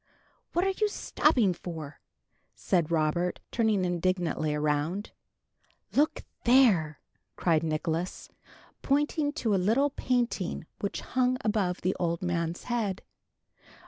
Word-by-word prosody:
"What 350 +2 +2
are 385 - +1
you 425 - +5
stopping 255 - +2
for?" 160 -4 -8 0.6
said 175 -5 +1
Robert, 170 +2 0
turning 220 -5 +2
indignantly 175 -3 0
around. 150 +6 -1 0.8
"Look 295 +2 +2 0.2
there!" 215 - +4 0.4
cried 165 -3 +2
Nicholas, 160 +2 -2 0.5
pointing 290 +1 +1
to 230 -9 0
a - - +4
little 255 +9 +2
painting 240 - -1
which 200 - -3
hung 255 0 +1
above 205 -5 0
the 185 +2 +1
old 170 0 -1
man's 170 -1 -2
head. 225 -6 -2
185 Hz, 110 wpm, -29 LUFS, 165-245 Hz, 0.8 s, you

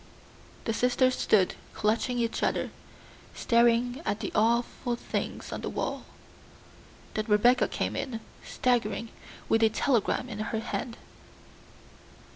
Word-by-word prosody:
The 225 - 0
sisters 250 +2 +2
stood 195 -4 +3 0.2
clutching 225 +3 +1
each 230 -1 -1
other, - - 0 0.6
staring 240 +2 +3
at 205 - -1
the 210 - -4
awful 235 +2 +1
things - - -4
on - - -4
the - - -3
wall. - - -3 1.1
Then 215 - -1
Rebecca 240 +4 +4
came - - -2
in, 235 -4 -3 0.2
staggering, 230 -2 0 0.4
with 225 - +3
a 225 - +6
telegram 240 +1 +1
in 215 -4 -6
her 215 +1 -2
hand. 230 +1 -4
230 Hz, 120 wpm, -28 LUFS, 220-245 Hz, 1.1 s, a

